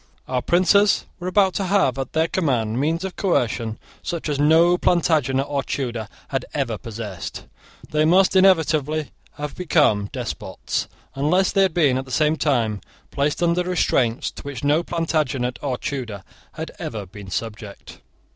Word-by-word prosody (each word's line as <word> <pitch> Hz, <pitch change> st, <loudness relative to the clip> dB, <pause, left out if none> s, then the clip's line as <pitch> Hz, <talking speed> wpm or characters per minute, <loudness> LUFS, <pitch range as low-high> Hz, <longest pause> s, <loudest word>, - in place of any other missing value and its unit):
Our 130 Hz, -1 st, -1 dB
princes 185 Hz, +6 st, +3 dB
were 180 Hz, -, -5 dB
about 190 Hz, 0 st, +3 dB
to 195 Hz, -, -1 dB
have 185 Hz, -9 st, +2 dB
at 135 Hz, -, -4 dB
their 160 Hz, +1 st, +2 dB
command 125 Hz, -, 0 dB
means 165 Hz, +5 st, 0 dB
of 190 Hz, -, -5 dB
coercion 115 Hz, -, 0 dB, 0.2 s
such 170 Hz, -2 st, -4 dB
as 145 Hz, -1 st, -1 dB
no 165 Hz, +4 st, +5 dB
Plantagenet 155 Hz, -7 st, +2 dB
or 140 Hz, -1 st, -1 dB
Tudor 120 Hz, -6 st, -3 dB, 0.2 s
had -, -, -1 dB
ever -, -, -1 dB
possessed. 105 Hz, -5 st, -7 dB, 0.4 s
They 150 Hz, 0 st, +1 dB
must 185 Hz, +4 st, +4 dB
inevitably 155 Hz, -5 st, +3 dB, 0.2 s
have 150 Hz, -1 st, -5 dB
become 150 Hz, -, +2 dB
despots, -, -, -4 dB, 0.3 s
unless 170 Hz, +7 st, +2 dB
they 195 Hz, -, +3 dB
had 190 Hz, -4 st, +2 dB
been, 140 Hz, -7 st, +3 dB
at 135 Hz, -, -5 dB
the -, -, -14 dB
same 155 Hz, +4 st, +2 dB
time, 120 Hz, -9 st, 0 dB, 0.3 s
placed 145 Hz, +4 st, 0 dB
under 170 Hz, +1 st, +2 dB
restraints 135 Hz, -9 st, +1 dB
to -, -, -10 dB
which 140 Hz, -2 st, -7 dB
no 145 Hz, +3 st, +3 dB
Plantagenet 155 Hz, -8 st, -1 dB
or 135 Hz, -4 st, -2 dB
Tudor 115 Hz, -9 st, -5 dB, 0.3 s
had -, -, -6 dB
ever 105 Hz, -3 st, -5 dB
been 95 Hz, +1 st, -11 dB
subject. 105 Hz, 0 st, -6 dB
150 Hz, 155 wpm, -22 LUFS, 125-170 Hz, 0.4 s, no